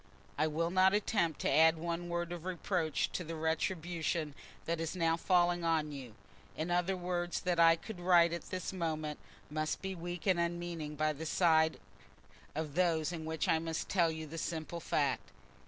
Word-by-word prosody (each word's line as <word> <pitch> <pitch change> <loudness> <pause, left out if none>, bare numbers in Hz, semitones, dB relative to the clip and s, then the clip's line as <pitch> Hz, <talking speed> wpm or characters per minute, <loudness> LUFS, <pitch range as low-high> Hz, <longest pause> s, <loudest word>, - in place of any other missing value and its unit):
"I 155 +2 +2
will 165 +2 -1
not 190 +2 +5
attempt 200 -6 0
to - - +1
add 160 +3 +6
by 160 - -10
one 170 0 -3
word 175 0 -2
of 175 -2 -5
reproach 175 -3 -1
to 180 - -3
the 165 0 -5
retribution 160 -1 -1 0.3
that 165 0 -1
is 165 +2 -3
now 165 -2 +2
falling 175 0 +2
on 160 -2 +1
you: 130 -6 -8 0.4
any 165 +3 -2
other 180 +2 +1
words 175 -1 -2
that 180 -1 0
I 165 0 +7
could 185 +3 -9
write 175 -1 +5
at 170 - -5
this 185 +1 -4
moment 155 -4 -2 0.3
must 155 0 -1
be 190 0 -2
weak 175 -1 -6
and 185 -3 +3
unmeaning 170 -3 -3
by 155 +1 +1
the 160 +2 -6
side 160 -2 +3 0.8
of 155 -2 -3
those 165 -2 +2
in 165 -2 -5
which 160 -1 -2
I 160 - +3
must 160 0 -3
tell 170 -4 +3
you 160 0 -5
the 160 +2 -6
simple 165 +1 -4
fact. 140 -5 0
165 Hz, 190 wpm, -33 LUFS, 160-175 Hz, 0.8 s, I